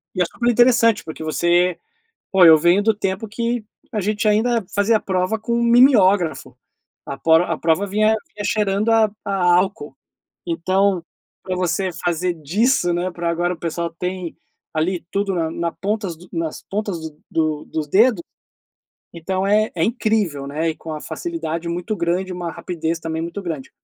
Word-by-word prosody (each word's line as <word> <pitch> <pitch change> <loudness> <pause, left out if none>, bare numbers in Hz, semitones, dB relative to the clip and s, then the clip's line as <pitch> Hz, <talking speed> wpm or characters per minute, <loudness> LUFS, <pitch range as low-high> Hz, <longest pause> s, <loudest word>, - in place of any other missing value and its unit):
e 185 - 0
é - - +4
super 240 +7 -1
interessante, 235 -2 +4
porque 160 0 -7
você 175 +3 +2 0.6
pô, 190 -2 +6
eu 160 -1 +9
venho 175 +5 +3
do 220 +1 +3
tempo 195 +1 -3
que 235 +2 -2 0.3
a 215 - -1
gente 210 +2 -1
ainda 225 +1 +2
fazia 205 +3 +3
a - - -13
prova 185 +3 -1
com 235 +2 -1
mimiógrafo, 200 - +4 0.5
a 140 - -6
pro 160 +3 +4
a 165 -3 -2
prova 165 +5 +1
vinha 215 +2 +2 0.2
vinha 205 - -6
cheirando 210 +1 +1
a 225 -1 +4
a 200 - -2 0.2
álcool. 180 -6 0 0.5
Então, 185 +2 +1 0.4
pra 185 -1 -3
você 180 +1 0
fazer 175 +1 0
disso, 175 - +1
né, 175 +2 -1
pra 170 0 -3
agora 175 +1 0
o - - -16
pessoal 170 +1 -3
tem, 180 -2 -4 0.4
ali, 170 +3 -1
tudo 200 -1 0
na 165 -2 -1
na 170 0 -3
ponta 210 +1 -2
dos 175 +1 -10
nas 165 -2 -3
pontas 205 -2 -2 0.3
do 155 -2 -1
dos 155 -2 -4
dedos, 210 - +4 0.9
então 185 +3 -2
é 215 +2 +3
é 165 -2 +1
incrível, 215 - 0
né, 155 +4 -1
e - - -5
com 160 - -8
a 150 - -6
facilidade 170 - -4
muito 175 +5 -3
grande, 180 +2 -1
uma 175 -1 -4
rapidez 165 -1 -3
também 160 0 -3
muito 170 +4 -5
grande. 160 -7 -5
185 Hz, 170 wpm, -20 LUFS, 165-210 Hz, 0.9 s, eu